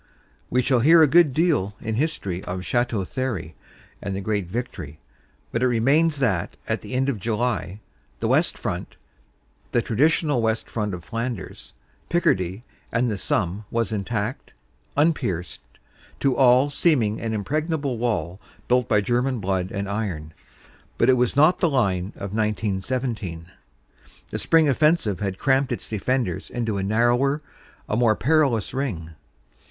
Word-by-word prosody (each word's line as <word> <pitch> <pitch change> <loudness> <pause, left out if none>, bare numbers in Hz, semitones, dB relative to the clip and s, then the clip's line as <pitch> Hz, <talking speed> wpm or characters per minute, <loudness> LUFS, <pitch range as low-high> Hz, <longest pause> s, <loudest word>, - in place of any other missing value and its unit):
We 125 +1 +2
shall 130 -1 +3
hear 160 +6 +7
a - - +6
good 160 +1 +5
deal 145 - +1
in 110 - -3
history 110 - -2
of 90 0 -4
Chateau 120 +1 0
Thierry 100 -10 -3 0.5
and 100 -1 -3
the 100 - -3
great 100 -3 -1
victory, 90 - -5 0.5
but 115 - -1
it 130 - +4
remains 140 +7 +3
that 105 -11 0
at - - -1
the 130 - -6
end 135 +1 +1
of 130 -7 -1
July 110 -2 -2 0.4
the - - -1
West - - +2
Front - - -4 0.8
the 120 - +3
traditional 145 +2 +2
West 110 0 0
Front 105 -4 -2
of 85 - -10
Flanders, 115 -2 -5 0.4
Picardy 95 - +1 0.3
and 120 0 +1
the - - -1
Somme 95 +2 -1
was 115 -2 -1
intact, 105 +3 -3 0.4
unpierced, 120 - 0 0.6
to 135 -2 +2
all 130 +2 +5
seem 145 -3 +3
ing 105 +1 -2
an 115 - -2
impregnable 145 - -2
wall 105 -6 -1 0.3
built 125 -2 +2
by 105 -2 +3
German 125 +3 0
blood 95 -2 -1
and 100 0 -3
iron. 95 -7 -4 0.6
But 120 +3 +5
it - - +4
was 125 0 +1
not 155 +6 +5
the 170 - +3
line 100 -10 +1
of 100 0 -6
1917. 105 -3 -2 0.8
The - - -3
spring 165 -2 +4
offensive 145 - +2
had 95 -2 -2
cramped 135 +1 +2
its 120 - -4
defenders 110 -2 -1
into 115 -5 -2
a - - -2
narrower, 120 +8 +2 0.4
a - - -1
more 115 -2 +3
perilous 135 -6 +2
ring. 105 - -3
115 Hz, 150 wpm, -24 LUFS, 100-135 Hz, 0.8 s, hear